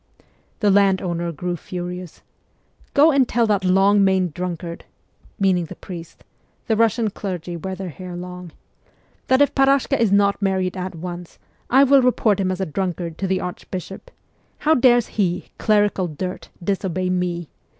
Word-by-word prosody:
'" - - -39
The 205 -2 +4
landowner 190 -4 +2
grew 175 +3 -3
furious. 180 0 -7 0.3
' - - -34
Go 300 +3 +6
and 275 -3 +3
tell 235 -1 +2
that 205 -3 +1
long 195 +2 +4
maned 190 -4 +2
drunkard 175 -1 -5 0.3
' - - -31
(meaning 185 -3 +2
the - - -10
priest; 170 -3 -10 0.4
the 220 - +1
Kussian 225 -1 +1
clergy 180 -3 -5
wear 190 +3 -5
their 190 -1 -6
hair 180 +2 -8
long) 180 -1 -8 0.4
' - - -38
that 260 +2 +5
if 285 - 0
Parashka 275 0 +3
is 225 -4 +2
not 200 0 +3
marriedx 190 -2 0
at 185 -1 -5
once, 175 +1 -7 0.3
I 265 +3 +6
will 275 0 +6
report 235 -5 +2
him 190 -1 0
as 185 - -4
a 190 - 0
drunkard 175 -1 -3
to 195 - -1
the 190 0 0
archbishop. 180 +1 -7 0.5
How 310 - +3
dares 245 -4 +4
he, 180 -4 -2
clerical 205 -4 +2
dirt, 180 +4 -6
disobey 185 -1 -1
me 175 -3 -2
190 Hz, 170 wpm, -21 LUFS, 180-210 Hz, 0.5 s, Go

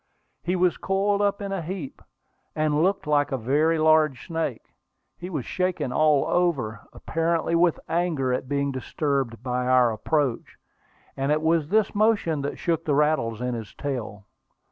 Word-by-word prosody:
He 180 +2 -1
was 180 -1 +2
coiled 200 +1 0
up 200 0 0
in 200 - -4
a 195 -2 -2
heap, 170 -4 -6 0.5
and 155 -1 +1
looked 190 +2 +1
like 145 -1 +1
a 135 - 0
very 150 +7 +1
large 155 -4 +3
snake. 160 -8 -4 0.4
He 175 +2 -8
was 150 -9 -4
shaking 180 -8 -1
all 150 -1 +3
over, 140 - 0
apparently 165 0 -1
with 170 0 +3
anger 165 -7 0
at 130 0 -3
being 140 -1 0
disturbed 130 -3 -2
by 125 0 -1
our 125 -2 +4
approach; 135 +2 -1 0.6
and 135 +2 -1
it 155 +1 +1
was 160 -2 +2
this 215 0 +2
motion 205 -8 +2
that 140 - -4
shook 165 -2 -1
the 145 - +1
rattles 140 -7 +1
in 125 0 -2
his 115 -3 -7
tail. 115 -8 -5
155 Hz, 165 wpm, -25 LUFS, 130-170 Hz, 0.6 s, our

